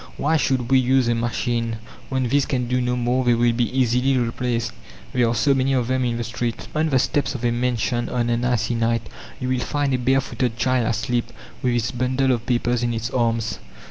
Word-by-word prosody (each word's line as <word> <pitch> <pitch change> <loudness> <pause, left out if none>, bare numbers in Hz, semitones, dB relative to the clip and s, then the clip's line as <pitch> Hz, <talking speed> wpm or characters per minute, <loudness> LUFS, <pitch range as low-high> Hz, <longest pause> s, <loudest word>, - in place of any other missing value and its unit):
Why 155 +3 +1
should 130 -4 0
we 130 - +6
use 130 0 +3
a 120 - +3
machine? 115 0 -1 0.3
When 130 -2 0
these 140 +3 +2
can 125 -3 -1
do 125 +1 +1
no 125 0 0
more, 125 +1 +1
they 120 -1 +3
will 120 0 +3
be 120 0 0
easily 130 +1 +2
replaced, 115 -1 -1 0.4
there 125 -2 +3
are 115 - 0
so 115 +6 +3
many 135 0 +1
of 125 -3 +1
them 130 0 +1
in 120 -1 -1
the 120 - -2
street!" 115 +1 -4
On 155 +1 +1
the 135 - +3
steps 145 +2 0
of 125 -1 -4
a 120 - +3
mansion 120 0 -1
on 120 -1 0
an 120 +1 0
icy 120 -2 +1
night 115 0 0 0.4
you 130 - -3
will 130 -1 +1
find 145 +2 -1
a 130 - +1
bare 130 +2 +3
footed 120 -2 -2
child 125 -1 +1
asleep, 115 +1 -1 0.3
with 125 -1 +1
its 120 0 0
bundle 130 +2 +1
of 120 -1 -1
papers 120 -1 +1
in 120 -1 0
its 115 +1 -3
arms 115 -2 0
125 Hz, 225 wpm, -22 LUFS, 115-130 Hz, 0.4 s, we